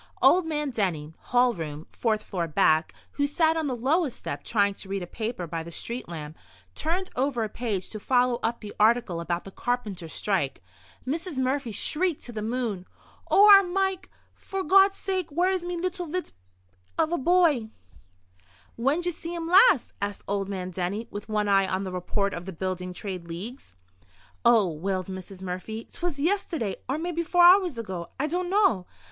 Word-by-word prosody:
Old 360 -2 +5
man 300 -3 -1
Denny, 165 -9 -2
hall 245 0 +2
room, 155 -3 -6
fourth 215 -2 0
floor 175 -4 -3
back, 155 +1 +3 0.2
who 285 0 0
sat 320 +2 +2
on 320 -2 -1
the 255 - -1
lowest 275 +4 +1
step, - - -6
trying 200 -2 +2
to 195 - -10
read 195 -1 -2
a - - -4
paper 220 0 -4
by 165 0 -4
the 165 - -8
street 235 +6 -6
lamp, 155 -2 -7 0.4
turned 360 - -2
over 255 -2 0
a 215 - -3
page 210 -4 -3
to 215 - -6
follow 245 +1 +2
up 230 +1 -1
the 210 -2 -8
article 215 -5 +3
about 170 +1 -2
the 195 - -10
carpenters' 210 -9 -3
strike. 180 - -1 0.4
Mrs. 320 +3 -3
Murphy 260 -1 0
shrieked 325 - 0
to 240 - -6
the 220 -2 -5
moon: 220 -5 -2 0.4
"Oh, 410 +1 +7
ar 405 -1 +11
r 395 - +4
Mike, 380 0 -1 0.3
f'r 385 -4 -5
Gawd's 390 +2 +6
sake, 375 -3 -2
where 350 +5 +2
is 370 -2 -1
me 350 0 -3
little 360 0 -3
bit 360 +4 -3 0.7
av 325 0 +2
a 345 - +1
boy?" 310 -7 +3 1.1
"When'd 285 +9 +1
ye 355 - +1
see 340 +1 -6
him 330 -1 -4
last?" 365 - +5
asked 200 -1 -3
old 200 -1 -1
man 185 -2 -4
Denny, 190 +5 -3
with 205 +1 -7
one 210 -1 0
eye 195 -1 +4
on 185 +1 -1
the 190 - -4
report 195 +2 -1
of 175 +2 -6
the 190 - -5
Building 185 +1 -3
Trades 180 -2 -6
League. 200 +11 -6 0.8
"Oh," 230 -4 +5
wailed 185 +3 -2
Mrs. 190 0 -8
Murphy, 190 +5 -5
"'twas 345 -4 -3
yisterday, 320 - -1
or 270 - 0
maybe 340 +1 -2
four 350 +1 +3
hours 355 -5 +6
ago! 185 -7 -5
I 290 - +1
dunno. 350 - +1
235 Hz, 185 wpm, -26 LUFS, -, 1.1 s, ar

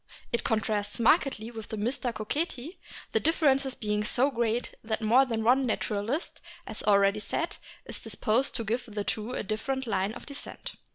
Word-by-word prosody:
It 235 - +1
contrasts 210 -1 0
markedly 235 -3 +3
with 220 -3 -7
the 220 - -5
Mystacoceti, 245 - -2 0.3
the - - +3
differences 275 -5 +2
being 210 -1 -1
so 255 +6 +2
great 235 -1 0
that 220 0 -2
more 245 +5 +6
than 225 -3 -1
one 255 +3 +4
naturalist, 220 - -1 0.2
as - - -6
already 200 0 +4
said, 320 +10 -2 0.3
is - - -3
dis - - -4
posed 240 +4 +2
to 230 - 0
give 235 +4 -1
to - - -14
the 205 -1 -3
two 220 +4 -2
a - - -2
different 265 +6 -2
line 200 -2 0
of - - -9
descent. 280 0 -7
230 Hz, 175 wpm, -29 LUFS, 215-265 Hz, 0.3 s, more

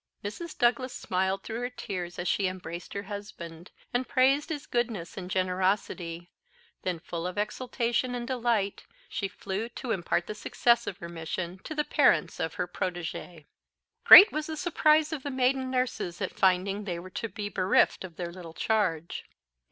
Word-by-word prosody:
Mrs. 305 +11 -6
Douglas 245 0 +2
smiled 190 +1 -1
through 225 +1 -4
her 245 0 -2
tears 180 -8 -5
as 180 - -3
she 195 +2 +2
embraced 180 -1 -6
her 200 - -3
husband, 185 -5 -8 0.2
and 250 +1 0
praised 275 +4 +3
his 305 -2 -4
goodness 230 -8 -2
and 180 -1 -6
generosity; 185 -2 -1 0.5
then, 180 -2 -2
full 170 +1 -5
of 180 - -6
exultation 240 +3 -1
and 240 -1 -3
delight, 235 -6 0 0.2
she 195 - -2
flew 195 +4 -4
to 240 0 -5
impart 175 -3 0
the - - -5
success 235 +2 +2
of 185 - -4
her 170 - -7
mission 170 +2 -5
to 315 - -5
the 300 - +1
parents - - +3
of - - -2
her - - -2
protégée. 175 -2 -5 0.6
Great 415 +3 +12
was 305 0 -2
the 315 -1 -4
surprise 310 -1 +3
of 300 - -3
the 285 - -4
maiden 260 0 +1
nurses 250 -9 -1
at 185 - -3
finding 195 +2 +2
they 175 -4 -3
were 185 +2 -9
to 230 - -4
be 210 -1 -4
bereft 190 -1 +2
of 180 -3 -9
their 170 -1 -4
little 170 -2 -10
charge. 185 -7 0
200 Hz, 175 wpm, -28 LUFS, 180-245 Hz, 0.6 s, Great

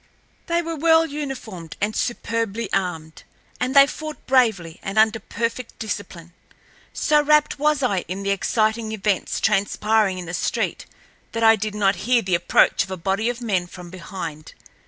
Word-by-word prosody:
They 340 0 +1
were 330 0 -4
well 325 +1 +4
uniformed 270 - -6
and 210 +1 -1
superbly 230 -2 -2
armed, 165 -5 -2 0.4
and 255 +2 -1
they 275 0 +9
fought 310 +2 -7
bravely 220 -11 +2
and 195 +2 -5
under 220 +1 +4
perfect 230 +3 -4
discipline. 185 -6 -6 0.6
So 300 0 +2
rapt 300 -1 +3
was 300 -1 +2
I 200 -7 +2
in 190 +3 -5
the 200 - 0
exciting 220 +2 0
events 205 -2 -1
transpiring 210 -1 +1
in 180 - -6
the 175 - -7
street 180 - -2 0.5
that 230 0 -1
I 225 0 +7
did 215 0 -4
not 200 -1 +2
hear 245 -2 +4
the 185 - -2
approach 170 - +3
of - - -11
a 190 - -4
body 195 +6 0
of 245 0 -4
men 190 -7 0
from 175 -1 -11
behind. 170 -4 -7
215 Hz, 165 wpm, -22 LUFS, 190-250 Hz, 0.6 s, they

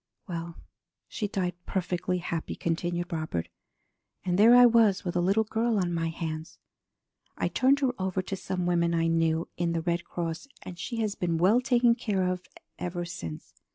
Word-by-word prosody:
"Well, 170 -2 -5 0.5
she 210 - -3
died 185 -3 -1
perfectly 180 -1 -1
happy," 170 -2 -4
continued 175 +1 -2
Robert. 155 - -3 0.8
"And 180 -1 +1
there 230 +3 +8
I 245 0 +9
was 225 -5 +4
with 175 - -2
a 175 - +2
little 195 +5 +3
girl 225 +1 0
on 180 -3 0
my 165 -1 0
hands! 160 -1 -5 0.8
I - - 0
turned 275 +2 +3
her 265 -2 +3
over 185 0 -1
to 195 - -4
some 185 -1 -3
women 170 -1 +2
I 165 0 +2
knew 165 0 +1
in 170 -1 0
the 165 - 0
Red 170 0 0
Cross, 170 +7 -4 0.2
and 175 -1 -9
she 230 +2 -3
has 215 -2 0
been 170 -4 -1
well 200 +9 +4
taken 245 -2 +4
care 205 -5 -1
of 180 0 -3 0.3
ever 175 0 -3
since. 85 - -7
180 Hz, 180 wpm, -28 LUFS, 170-205 Hz, 0.8 s, I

